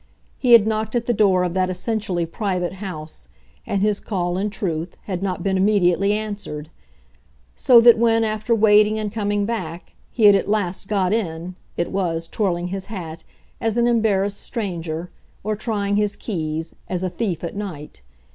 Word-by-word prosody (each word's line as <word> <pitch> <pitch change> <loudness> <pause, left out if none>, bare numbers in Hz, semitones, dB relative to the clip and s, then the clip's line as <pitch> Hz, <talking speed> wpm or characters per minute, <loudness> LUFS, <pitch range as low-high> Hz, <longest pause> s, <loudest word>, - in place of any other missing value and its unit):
He 245 -3 +4
had 225 -3 +8
knocked 220 +1 -1
at 240 -1 0
the 240 - +1
door 195 -4 +3
of 180 -1 -1
that 185 0 +1
essentially 185 -2 -2
private 180 -1 -2
house, 155 - -7 0.4
and 200 0 0
his 210 -1 +1
call, 175 -4 -2
in 200 +3 -1
truth, 175 -4 -4
had 185 -3 -4
not 185 -3 -2
been 190 0 +1
immediately 195 -1 +3
answered; 200 -8 -4 0.8
so 245 -2 +6
that 235 -1 +7
when, 225 -1 +3
after 215 +1 0
waiting 210 0 +5
and 215 -1 -3
coming 205 -1 -1
back, 180 -7 -5 0.2
he 230 - -2
had 205 -1 +9
at 195 0 +1
last 195 -3 -1
got 195 -2 +1
in, 175 -5 -2 0.2
it 170 - -1
was, 170 -4 -1
twirling 180 -4 -1
his 190 0 -4
hat, 165 -6 -7 0.4
as 225 0 -1
an 235 - +3
embarrassed 205 -4 +1
stranger, 175 -6 -4 0.3
or, 215 +1 -1
trying 205 -2 -1
his 210 -1 +1
keys, 160 -5 -4 0.2
as 180 0 -2
a 185 - 0
thief 180 -3 -3
at 170 - -4
night. 160 - -7
200 Hz, 175 wpm, -22 LUFS, 175-215 Hz, 0.8 s, had